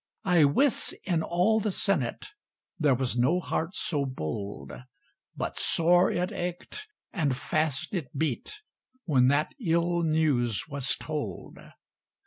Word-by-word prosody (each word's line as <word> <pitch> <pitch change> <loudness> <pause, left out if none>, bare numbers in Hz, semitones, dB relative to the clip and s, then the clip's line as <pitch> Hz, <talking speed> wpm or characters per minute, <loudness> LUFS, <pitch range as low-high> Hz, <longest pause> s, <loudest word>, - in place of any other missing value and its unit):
I 175 -5 +5
wis, 245 - +2
in 170 -4 0
all 180 +7 +2
the 215 - -1
Senate 175 - -1 0.5
There 145 -5 +4
was 125 -1 -1
no 135 +9 +3
heart 170 0 -3
so 145 -4 -1
bold 80 - -5 0.7
But - - -3
sore 175 +2 +4
it 180 +1 -1
ached, 180 - -5 0.3
and 140 -6 0
fast 155 +4 -1
it 170 -9 -2
beat, 160 - -2 0.4
When 130 -6 +4
that 145 +3 +1
ill 170 0 +1
news 150 -9 +1
was 140 -3 0
told. 145 - -6
155 Hz, 125 wpm, -28 LUFS, 130-175 Hz, 0.7 s, I